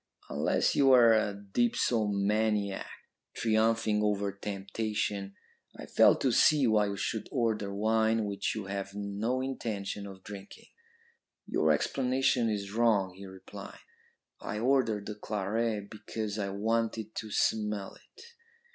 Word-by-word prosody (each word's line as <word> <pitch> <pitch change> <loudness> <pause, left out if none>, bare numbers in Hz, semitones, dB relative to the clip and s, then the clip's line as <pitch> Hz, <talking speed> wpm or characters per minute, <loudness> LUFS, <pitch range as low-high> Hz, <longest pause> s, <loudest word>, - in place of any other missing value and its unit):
Unless - - +1
you 135 -1 +5
are 120 -3 +7
a 105 -2 +1
dipsomaniac, 105 -1 0 0.5
triumphing 110 -1 +2
over 100 -1 0
temptation, 100 0 -3 0.4
I - - -8
fail - - +5
to 130 - 0
see 145 +4 +5
why 105 -3 +3
you 100 0 -4
should 110 +3 -3
order 110 -6 0
wine 110 +2 +1
which 100 +1 -2
you 110 -3 -4
have 100 0 -5
no 105 +5 -2
intention 105 -6 -4
of 95 -1 -11
drinking.' 100 -1 -11 0.8
"'Your - - +1
explanation 130 -2 +1
is 100 -2 -3
wrong,' 110 -5 +2
he 95 +1 -10
replied. 95 0 -10 0.6
'I 105 - -4
ordered 120 -5 +2
the 105 - -4
claret 105 +1 -2
because 110 -1 -5
I 100 -1 -1
wanted 110 +1 -1
to 110 - -4
smell 105 -1 0
it.' - - -17
105 Hz, 130 wpm, -30 LUFS, 100-115 Hz, 0.8 s, are